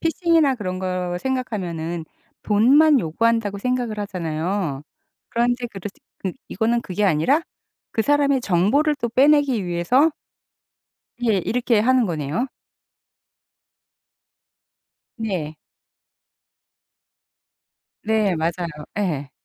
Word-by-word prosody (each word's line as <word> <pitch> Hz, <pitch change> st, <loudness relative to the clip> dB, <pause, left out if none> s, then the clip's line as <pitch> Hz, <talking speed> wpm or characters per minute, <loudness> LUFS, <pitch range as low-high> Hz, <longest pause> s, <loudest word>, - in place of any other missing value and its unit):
피싱이나 330 Hz, -4 st, +2 dB
그런 185 Hz, -6 st, -4 dB
거 180 Hz, -1 st, -2 dB
생각하면은 180 Hz, -11 st, -3 dB, 0.4 s
돈만 270 Hz, +8 st, +5 dB
요구한다고 210 Hz, +4 st, 0 dB
생각을 245 Hz, -1 st, -2 dB
하잖아요. 170 Hz, -4 st, -3 dB, 0.5 s
그런데 240 Hz, +1 st, 0 dB
그르치 205 Hz, +4 st, -9 dB, 0.2 s
그 190 Hz, -, -3 dB, 0.2 s
이거는 230 Hz, +4 st, 0 dB
그게 205 Hz, -1 st, -2 dB
아니라 195 Hz, -, +3 dB, 0.5 s
그 225 Hz, -, 0 dB
사람의 285 Hz, 0 st, +2 dB
정보를 235 Hz, -, +2 dB
또 240 Hz, -, 0 dB
빼내기 270 Hz, -4 st, +3 dB
위해서 240 Hz, -, +2 dB, 1.1 s
예. 225 Hz, -4 st, +2 dB
이렇게 235 Hz, -2 st, +1 dB
하는 255 Hz, +1 st, +3 dB
거네요. 160 Hz, -, -2 dB, 2.7 s
네. 185 Hz, -, -3 dB, 2.5 s
네. 215 Hz, -3 st, +2 dB
맞아요. 170 Hz, +2 st, -1 dB, 0.3 s
예. 150 Hz, -9 st, -2 dB
215 Hz, 215 characters per minute, -22 LUFS, 180-255 Hz, 2.7 s, 돈만